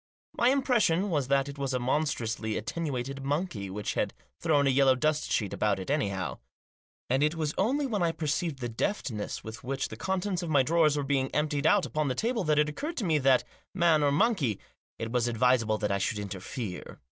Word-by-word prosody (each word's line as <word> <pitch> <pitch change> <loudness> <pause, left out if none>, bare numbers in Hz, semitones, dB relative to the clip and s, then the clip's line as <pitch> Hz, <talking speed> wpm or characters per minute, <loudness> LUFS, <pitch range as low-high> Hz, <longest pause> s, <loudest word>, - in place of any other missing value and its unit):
My 240 - +3
impression 235 -9 +2
was 145 -5 0
that 140 0 +2
it 140 0 -8
was 135 -1 -1
a - - +1
monstrously 120 -5 -1
attenuated 135 -1 -3
monkey, 140 - -2
which 105 +2 -3
had - - -1 0.2
thrown 150 -4 +2
a 135 - +4
yellow 135 0 +5
dust 155 +3 0
sheet 105 -4 0
about 105 -2 +1
it 95 - -4
anyhow. 95 - -1 0.7
And 130 +2 +1
it 150 +2 +2
was 155 -2 -1
only 270 +9 +1
when 215 -7 -1
I 170 -1 +2
perceived 155 -2 -2
the 120 - -1
deftness 115 - -3
with 110 +3 -8
which 135 +1 -2
the - - -7
contents 190 - -2
of 170 - -4
my 140 -4 +4
drawers 155 0 +3
were 145 - 0
being 135 -1 0
emptied 150 0 +1
out 200 +3 +4
upon 155 -2 -1
the 130 - -1
table 230 -1 0
that 150 -1 +2
it 150 0 +4
occurred 300 - -5
to 220 - -1
me 155 -3 +2
that, 130 -2 +4 0.3
man 170 -4 +4
or 145 -1 +3
monkey, 150 - +1 0.4
it 115 0 -4
was 120 -1 +1
advisable 120 -2 +2
I 100 -1 0
should 105 +3 -1
interfere. 100 +1 -6
140 Hz, 205 wpm, -29 LUFS, 120-165 Hz, 0.7 s, yellow